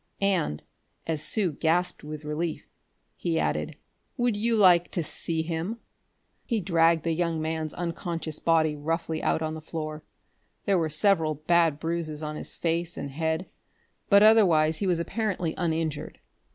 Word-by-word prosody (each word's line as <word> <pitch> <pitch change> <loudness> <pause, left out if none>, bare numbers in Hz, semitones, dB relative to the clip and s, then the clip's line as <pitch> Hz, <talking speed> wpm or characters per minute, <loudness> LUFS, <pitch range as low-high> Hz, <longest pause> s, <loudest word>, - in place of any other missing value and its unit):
And, 175 - +1 0.4
as 160 -2 -2
Sue 190 +2 0
gasped 175 +4 0
with 150 0 -7
relief, 155 +2 -3 0.5
he 165 -2 -1
added: - - -1 0.4
"Would 240 -3 +1
you 225 +2 +1
like 180 -4 +5
to 170 - 0
see 160 +1 -3
him?" 165 +7 -3 0.7
He 230 -3 -1
dragged 165 -3 +3
the 165 - 0
young 165 -1 0
man's 160 0 -2
unconscious 170 -2 -3
body 160 -2 +2
roughly 160 +2 -2
out 160 - +1
on 155 0 -2
the 160 - -7
floor. 155 -1 -5 0.6
There 195 -3 +3
were 160 -1 0
several 160 -1 +2
bad 160 0 +2
bruises 160 -2 -3
on 150 0 -4
his - - -6
face 170 0 -1
and 140 - -5
head, 160 +4 -1 0.6
but 200 0 +7
otherwise 170 -8 +5
he 200 - -1
was 175 -2 +2
apparently 180 -3 -2
uninjured. 160 -4 -2
165 Hz, 150 wpm, -27 LUFS, 155-175 Hz, 0.7 s, but